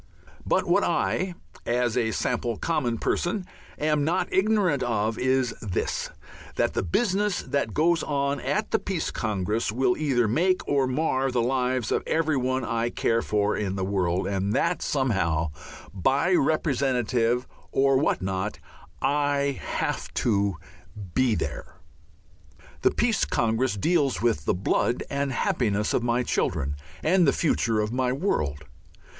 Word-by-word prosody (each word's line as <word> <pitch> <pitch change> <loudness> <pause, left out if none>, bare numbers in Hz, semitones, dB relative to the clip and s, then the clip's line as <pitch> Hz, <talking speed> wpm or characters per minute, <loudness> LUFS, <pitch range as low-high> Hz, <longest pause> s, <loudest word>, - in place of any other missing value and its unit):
But - - +2
what - - +3
I, 185 -2 0 0.3
as 120 -1 0
a 115 -3 +1
sample 115 0 -1
common 135 -8 -1
person, 180 - -1 0.3
am 150 -1 +1
not 170 +5 0
ignorant 190 -8 +2
of 110 -2 0
is 130 -1 +2
this: 95 -5 -2 0.5
that - - +1
the - - 0
business 195 - 0
that 140 -7 -2
goes 165 +1 +3
on 140 -1 -1
at - - -1
the - - +2
Peace - - -2
Congress 105 +1 -1
will 130 +11 +2
either 130 -7 +1
make 180 - +1
or 140 -2 +2
mar 135 -1 0
the 125 -2 0
lives 125 -2 0
of - - +2
everyone 130 -5 0
I 115 0 0
care 115 -1 +1
for 105 -1 0
in 95 -2 -2
the 95 -1 -2
world, 95 -2 0
and 100 +1 -1
that 170 +5 +1
somehow, 90 - 0 0.4
by 135 - +2
representative 130 -6 +1 0.3
or 135 0 +3
what 140 - 0
not, 95 +2 -2 0.5
I 140 -1 +1
have - - -2
to 100 -4 +1 0.6
be 130 -4 +2
there. - - -5 1.1
The - - +5
Peace 225 -5 +1
Congress 115 0 0
deals 145 - +1
with 95 - 0
the - - +1
blood 110 +6 0
and 140 0 -1
happiness 105 -5 0
of - - +2
my 120 +1 +1
children 70 - -1 0.3
and 175 0 +4
the - - +6
future 115 -8 +1
of 105 +2 -1
my 125 0 +1
world. 75 - -1
125 Hz, 145 wpm, -26 LUFS, 110-145 Hz, 1.1 s, the